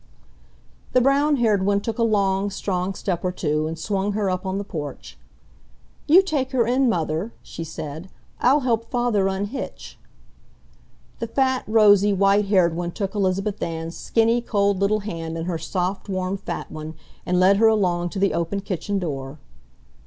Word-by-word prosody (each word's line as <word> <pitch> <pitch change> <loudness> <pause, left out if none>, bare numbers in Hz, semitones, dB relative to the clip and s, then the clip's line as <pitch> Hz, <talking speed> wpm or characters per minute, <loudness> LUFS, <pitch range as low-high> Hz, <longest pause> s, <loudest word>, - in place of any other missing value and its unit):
The 255 - +6
brown 280 +4 +3
haired 215 -6 +2
one 200 +1 +2
took 225 +3 -4
a - - +3
long, 200 -2 +1
strong 190 -1 -2
step 180 -4 -3
or 180 - 0
two 155 -3 -1
and 160 +1 -5
swung 200 +4 -1
her 200 -2 0
up 185 +1 -3
on 190 +1 -2
the 200 - -2
porch. 150 -7 -7 0.9
"You 350 +6 +7
take 280 -7 -2
her 240 -3 +3
in, 255 +2 +2
Mother," 165 +2 -1
she 165 - -7
said. 160 +2 -7 0.3
"I'll 275 +4 +4
help 230 -3 0
Father 240 -6 +1
unhitch." 200 +7 -5 1.2
The 230 - -3
fat, 260 +1 0
rosy, 205 -2 +5
white 200 +1 +3
haired 180 -5 +3
one 175 0 -3
took 195 -2 -3
Elizabeth 195 0 -1
Ann's 165 0 -4
skinny, 230 +1 +1
cold 200 -4 +1
little 210 +2 +1
hand 165 -5 -5
in 165 - -4
her 170 -2 -2
soft 185 +5 -3
warm 185 0 -1
fat 195 - -6
one, 155 +1 -7 0.3
and 180 0 +1
led 190 +2 +5
her 225 +2 +5
along 180 -5 +1
to 195 - -7
the 195 0 +2
open 170 +4 -2
kitchen 200 +1 -3
door. 140 -5 -4
195 Hz, 170 wpm, -23 LUFS, 175-220 Hz, 1.2 s, You